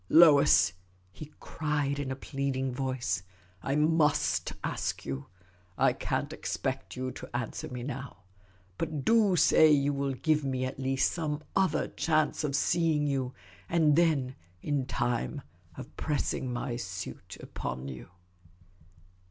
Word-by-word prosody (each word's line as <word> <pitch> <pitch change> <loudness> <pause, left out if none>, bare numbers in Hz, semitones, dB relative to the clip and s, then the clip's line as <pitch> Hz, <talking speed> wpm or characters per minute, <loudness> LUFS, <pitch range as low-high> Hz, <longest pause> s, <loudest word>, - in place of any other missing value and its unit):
" - - -33
Lois," 150 - +7 0.4
he 155 +7 -10
cried, 145 -2 -2
in 140 -2 -3
a 130 - -2
pleading 135 -1 -2
voice, 130 -5 -1 0.2
" 90 +1 -32
I 135 - -1
vtust 150 -1 +2
ask - - -3
you; 70 0 -5 0.5
I - - +4
can't - - -2
expect - - -3
you 130 0 -3
to - - -9
answer 120 -2 -3
me 125 -1 -6
now, 130 -5 -7 0.6
but 155 -5 -3
do 220 -5 +4
say 160 -1 +6
you 145 -1 +3
will 140 -1 -1
give 155 +3 +1
me 130 -1 -1
at 130 - -5
least 135 0 +1
some 155 -3 -3
other 185 -5 +2
chance 155 -1 0
of 140 -2 -1
seeing 160 0 +2
you, 135 -3 -1 0.3
and 160 -3 +4
then, 150 -6 +2 0.3
in 140 -3 -1
time, 120 +4 -1 0.3
of 145 - -9
pressing 145 -4 -1
my 120 0 -3
suit 95 - -7
upon 65 +2 -5
you." 65 -2 -8
140 Hz, 145 wpm, -29 LUFS, 130-155 Hz, 0.6 s, Lois